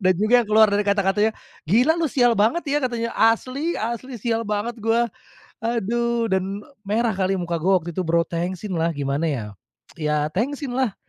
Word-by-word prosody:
Dan 185 Hz, -1 st, +3 dB
juga 240 Hz, +4 st, +4 dB
keluar 215 Hz, 0 st, +6 dB
dari 205 Hz, -, +2 dB
kata-katanya, 200 Hz, +2 st, +2 dB, 0.4 s
"gila 245 Hz, -, +4 dB
lu 320 Hz, -, +1 dB
sial 245 Hz, -3 st, +3 dB
banget 230 Hz, +13 st, +2 dB
ya" 290 Hz, +1 st, +2 dB
katanya, 230 Hz, -2 st, -2 dB
"asli 255 Hz, +8 st, +1 dB
asli, 235 Hz, +3 st, -4 dB
sial 230 Hz, +1 st, 0 dB
banget 215 Hz, +2 st, -2 dB
gue". 225 Hz, +2 st, +2 dB, 0.6 s
Aduh 235 Hz, 0 st, 0 dB
dan 190 Hz, +2 st, -1 dB, 0.2 s
merah 225 Hz, +3 st, +1 dB
kali 190 Hz, 0 st, +1 dB
muka 170 Hz, -1 st, -2 dB
gue 185 Hz, +5 st, +1 dB
waktu 175 Hz, -, -6 dB
itu, 185 Hz, -, 0 dB
Bro. 170 Hz, +1 st, +3 dB
Tengsinlah, 170 Hz, -1 st, -2 dB
gimana 140 Hz, +2 st, -1 dB
ya, 135 Hz, -8 st, -2 dB, 0.5 s
ya 150 Hz, -1 st, 0 dB
tengsinlah 260 Hz, -, -1 dB
215 Hz, 160 wpm, -23 LUFS, 185-235 Hz, 0.6 s, keluar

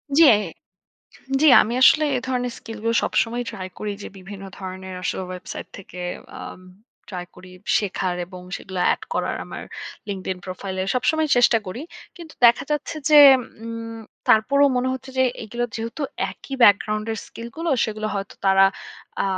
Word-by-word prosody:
জি, 330 Hz, -, +8 dB, 1.2 s
জি 310 Hz, -, +5 dB, 0.2 s
আমি 230 Hz, -, -3 dB
আসলে 305 Hz, +4 st, +7 dB
এ -, -, +1 dB
ধরনের 250 Hz, -1 st, -1 dB
স্কিলগুলো 225 Hz, 0 st, -3 dB
সবসময়ই 240 Hz, +2 st, 0 dB
ট্রাই 185 Hz, -1 st, -6 dB
করি 210 Hz, -, -3 dB
যে -, -, -6 dB
বিভিন্ন 195 Hz, +1 st, -9 dB
ধরনের 185 Hz, -1 st, -7 dB
আসলে 190 Hz, -, -2 dB
ওয়েবসাইট 185 Hz, 0 st, -7 dB
থেকে 180 Hz, -2 st, -10 dB, 0.4 s
আ -, -, -8 dB, 0.7 s
ট্রাই 180 Hz, -3 st, -5 dB
করি 180 Hz, 0 st, -14 dB, 0.3 s
শেখার 190 Hz, -3 st, -2 dB
এবং 180 Hz, 0 st, -11 dB
সেগুলো 190 Hz, -2 st, -7 dB
এড -, -, -5 dB
করার -, -, -1 dB
আমার -, -, -8 dB, 0.5 s
লিঙ্কড 195 Hz, -2 st, -5 dB
ইন 185 Hz, -, -9 dB
প্রোফাইলে 185 Hz, 0 st, -4 dB
সবসময় 315 Hz, +5 st, +1 dB
চেষ্টা 240 Hz, -1 st, +5 dB
করি। 185 Hz, +7 st, -6 dB, 0.4 s
কিন্তু 330 Hz, -3 st, -11 dB
দেখা 235 Hz, +3 st, +6 dB
যাচ্ছে 300 Hz, +2 st, -2 dB
যে 300 Hz, -, +9 dB, 0.5 s
উম 230 Hz, 0 st, -6 dB, 0.3 s
তারপরেও 280 Hz, +6 st, +5 dB
মনে 250 Hz, +1 st, +1 dB
হচ্ছে 260 Hz, 0 st, -7 dB
যে 260 Hz, -, +5 dB, 0.2 s
এগুলো 235 Hz, +3 st, -3 dB
যেহেতু 230 Hz, +6 st, -5 dB, 0.3 s
একই 275 Hz, -, -8 dB
ব্যাকগ্রাউন্ডের 215 Hz, +1 st, +3 dB
স্কিলগুলো 235 Hz, +9 st, -5 dB
সেগুলো 215 Hz, -1 st, -3 dB
হয়তো 195 Hz, 0 st, -4 dB
তারা 195 Hz, 0 st, +6 dB, 0.6 s
আ -, -, 0 dB
220 Hz, 150 wpm, -23 LUFS, 190-250 Hz, 1.2 s, যে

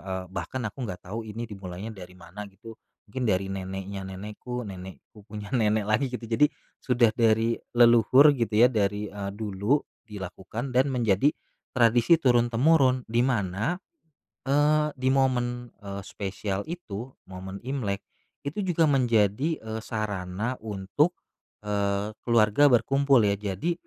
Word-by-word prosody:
eee, 95 Hz, -1 st, -5 dB
bahkan 95 Hz, +8 st, -4 dB
aku 120 Hz, +3 st, -4 dB
nggak 90 Hz, 0 st, -7 dB
tahu 115 Hz, -1 st, -5 dB
ini 115 Hz, +3 st, -5 dB
dimulainya 100 Hz, 0 st, -7 dB
dari 90 Hz, -3 st, -11 dB
mana 95 Hz, +4 st, -9 dB
gitu, 110 Hz, +4 st, -12 dB, 0.3 s
mungkin 120 Hz, +3 st, -3 dB
dari 95 Hz, 0 st, 0 dB
neneknya 95 Hz, 0 st, -5 dB
nenekku, 105 Hz, +6 st, -6 dB
nenekku 95 Hz, +1 st, -11 dB
punya 105 Hz, -1 st, -8 dB
nenek 110 Hz, -4 st, +2 dB
lagi 110 Hz, +6 st, +1 dB
gitu, 125 Hz, -1 st, -6 dB
jadi 120 Hz, +6 st, +3 dB, 0.3 s
sudah 120 Hz, -3 st, +3 dB
dari 115 Hz, 0 st, +2 dB, 0.2 s
leluhur 120 Hz, +5 st, +7 dB
gitu 115 Hz, -4 st, +3 dB
ya, 125 Hz, -, +4 dB
dari, 105 Hz, -1 st, -1 dB
eee, 100 Hz, -1 st, -5 dB
dulu 105 Hz, +4 st, 0 dB, 0.3 s
dilakukan 105 Hz, +5 st, -6 dB
dan 130 Hz, +3 st, +3 dB
menjadi 120 Hz, +1 st, +2 dB, 0.4 s
tradisi 120 Hz, +6 st, +5 dB
turun-temurun, 130 Hz, 0 st, +3 dB
di 115 Hz, +2 st, +1 dB
mana, 110 Hz, -, 0 dB, 0.7 s
eee, 150 Hz, +2 st, +3 dB
di 130 Hz, +1 st, +1 dB
momen, 125 Hz, -2 st, 0 dB
eee, 100 Hz, -1 st, -7 dB
spesial 100 Hz, 0 st, -4 dB
itu, 130 Hz, -, -7 dB, 0.2 s
momen 95 Hz, +1 st, -8 dB
Imlek, 120 Hz, -6 st, -3 dB, 0.4 s
itu 140 Hz, +8 st, -4 dB
juga 170 Hz, -3 st, +2 dB
menjadi, 125 Hz, -, +2 dB
eee, 110 Hz, 0 st, -5 dB
sarana 105 Hz, 0 st, -3 dB
untuk, 110 Hz, -, 0 dB, 0.5 s
eee, 100 Hz, 0 st, -1 dB, 0.2 s
keluarga 115 Hz, +4 st, +5 dB
berkumpul 135 Hz, +1 st, +4 dB
ya, 100 Hz, -, +3 dB
jadi 105 Hz, -, -2 dB
110 Hz, 135 wpm, -26 LUFS, 100-125 Hz, 0.7 s, leluhur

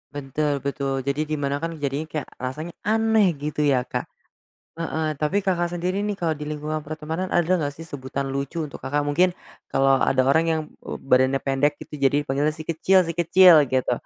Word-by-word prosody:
Betul 145 Hz, 0 st, -2 dB
betul, 140 Hz, -1 st, -2 dB
jadi 145 Hz, +3 st, -1 dB
di 155 Hz, -, -1 dB
mana 140 Hz, +1 st, -1 dB
kan, 165 Hz, 0 st, -4 dB
jadinya 140 Hz, +3 st, -2 dB
kayak 150 Hz, -2 st, -5 dB
rasanya 150 Hz, +7 st, -5 dB, 0.2 s
aneh 220 Hz, -2 st, +3 dB, 0.2 s
gitu 150 Hz, 0 st, -3 dB
ya 140 Hz, -4 st, +3 dB
Kak -, -, -4 dB, 0.7 s
heeh. 160 Hz, -1 st, -2 dB
Tapi, 180 Hz, +7 st, 0 dB
Kakak, 175 Hz, -2 st, 0 dB
sendiri 180 Hz, +3 st, -1 dB
nih 210 Hz, -, -1 dB
kalau 170 Hz, -4 st, -1 dB
di 150 Hz, -, -6 dB
lingkungan 150 Hz, +1 st, -3 dB
pertemanan 160 Hz, +4 st, -4 dB
ada 175 Hz, 0 st, +2 dB
enggak 145 Hz, -3 st, -2 dB
sih 165 Hz, -, -10 dB
sebutan 140 Hz, -3 st, -5 dB
lucu 140 Hz, +5 st, -3 dB
untuk 150 Hz, -2 st, -7 dB
Kakak, 145 Hz, +2 st, -1 dB
Mungkin 175 Hz, +5 st, +2 dB, 0.3 s
kalau 135 Hz, 0 st, +3 dB
ada 130 Hz, +1 st, +2 dB
orang 140 Hz, +5 st, +3 dB
yang, 160 Hz, -1 st, +1 dB, 0.3 s
eee, -, -, -4 dB
badannya 130 Hz, 0 st, +3 dB
pendek 145 Hz, +2 st, 0 dB
gitu 150 Hz, -1 st, -9 dB
jadi 145 Hz, +2 st, +2 dB
panggilnya 145 Hz, +2 st, 0 dB
si 155 Hz, -, -7 dB
kecil 175 Hz, +4 st, +3 dB
si 165 Hz, -, -4 dB
kecil 170 Hz, -3 st, +7 dB
gitu, 130 Hz, 0 st, 0 dB
150 Hz, 190 wpm, -23 LUFS, 140-165 Hz, 0.7 s, kecil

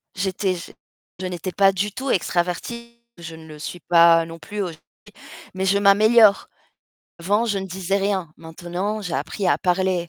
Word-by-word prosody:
j'étais 190 Hz, 0 st, -1 dB
j 170 Hz, -, -10 dB, 0.5 s
je 185 Hz, -, -5 dB
n'étais 180 Hz, +1 st, -5 dB
pas 195 Hz, +1 st, +4 dB
du 200 Hz, +2 st, -2 dB
tout 265 Hz, +1 st, -5 dB
extravertie, 235 Hz, +7 st, -2 dB, 0.2 s
je 165 Hz, -1 st, -9 dB
ne 160 Hz, 0 st, -13 dB
le 155 Hz, -1 st, -11 dB
suis 175 Hz, +3 st, -7 dB
pas 170 Hz, 0 st, +5 dB
non 165 Hz, 0 st, -10 dB
plus 210 Hz, +4 st, -6 dB
aujourd'hui 170 Hz, -4 st, -6 dB, 0.7 s
mais 190 Hz, +1 st, -2 dB
je 200 Hz, +1 st, +3 dB
m'améliore. 210 Hz, +1 st, +5 dB, 0.7 s
Avant, 205 Hz, +7 st, +1 dB
je 205 Hz, -3 st, -1 dB
ne 190 Hz, -, -5 dB
disais 190 Hz, +1 st, -2 dB
rien, 195 Hz, -5 st, -2 dB
maintenant, 175 Hz, +6 st, -5 dB
j'ai 180 Hz, -4 st, -4 dB
appris 165 Hz, +7 st, -3 dB
à -, -, +3 dB
parler 180 Hz, -1 st, 0 dB
185 Hz, 175 wpm, -22 LUFS, 170-200 Hz, 0.7 s, pas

